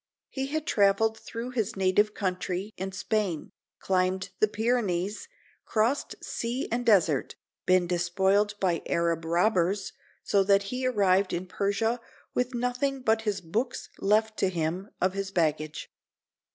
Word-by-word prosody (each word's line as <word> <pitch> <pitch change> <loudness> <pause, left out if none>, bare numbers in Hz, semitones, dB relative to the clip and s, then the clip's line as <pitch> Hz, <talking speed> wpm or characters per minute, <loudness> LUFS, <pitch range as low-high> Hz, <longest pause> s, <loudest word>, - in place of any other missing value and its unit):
He 270 -1 -2
had 310 +2 -2
traveled 220 0 +3
through 235 +2 -6
his 230 -2 -1
native 195 +2 +2
country 185 +1 -2
and 190 +1 -4
Spain, 190 -4 -2 0.3
climbed 185 0 0
the 215 - +5
Pyrenees, 210 -4 -1 0.4
crossed 230 +6 0
sea 240 +4 -3
and 240 +1 0
desert, 180 - +3 0.3
been 185 -1 +4
despoiled 190 +4 +1
by 175 -4 +1
Arab 170 -1 0
robbers, 185 +2 +1 0.3
so 200 -1 +3
that 200 0 +4
he 255 0 -1
arrived 195 -5 +2
in 175 +2 -2
Persia 200 +5 0 0.3
with 250 0 -1
nothing 250 +2 -1
but 220 -1 +3
his 200 - -2
books 220 +9 -3
left 215 +2 +2
to 190 - +3
him 175 +3 -2
of 185 0 +1
his 195 0 -3
baggage. 155 -4 -1
200 Hz, 140 wpm, -28 LUFS, 185-225 Hz, 0.4 s, the